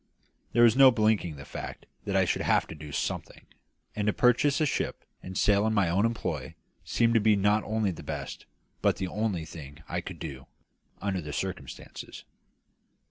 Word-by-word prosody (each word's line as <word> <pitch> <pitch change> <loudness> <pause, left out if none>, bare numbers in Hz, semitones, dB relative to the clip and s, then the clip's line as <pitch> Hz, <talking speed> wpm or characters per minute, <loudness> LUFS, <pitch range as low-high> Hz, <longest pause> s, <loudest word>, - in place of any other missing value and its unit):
There 120 - +5
was 115 -1 +6
no 135 0 +9
blinking 110 -8 +1
the 70 -1 -10
fact - - -7 0.2
that - - -2
I - - +4
should - - 0
have - - +3
to - - -6
do 75 -1 -9
something; - - -4 0.5
and 105 0 -1
to 105 - +3
purchase 130 +5 +3
a 155 - +3
ship 140 - -2 0.2
and 95 0 -7
sail 105 +1 +3
in 110 - +1
my 100 -5 +3
own 100 +6 +3
employ 115 0 -4 0.3
seemed 115 0 +2
to 115 - +5
be 105 0 +4
not 105 +2 +2
only 110 -2 0
the 85 - -8
best - - -6 0.3
but - - +3
the 95 - -2
only 100 -4 -2
thing 75 -1 -10
I 85 +1 -2
could 90 0 -8
do, 70 -5 -7 0.6
under 95 -3 -1
the 75 -2 -6
circumstances. - - -6
105 Hz, 190 wpm, -28 LUFS, 85-110 Hz, 0.6 s, no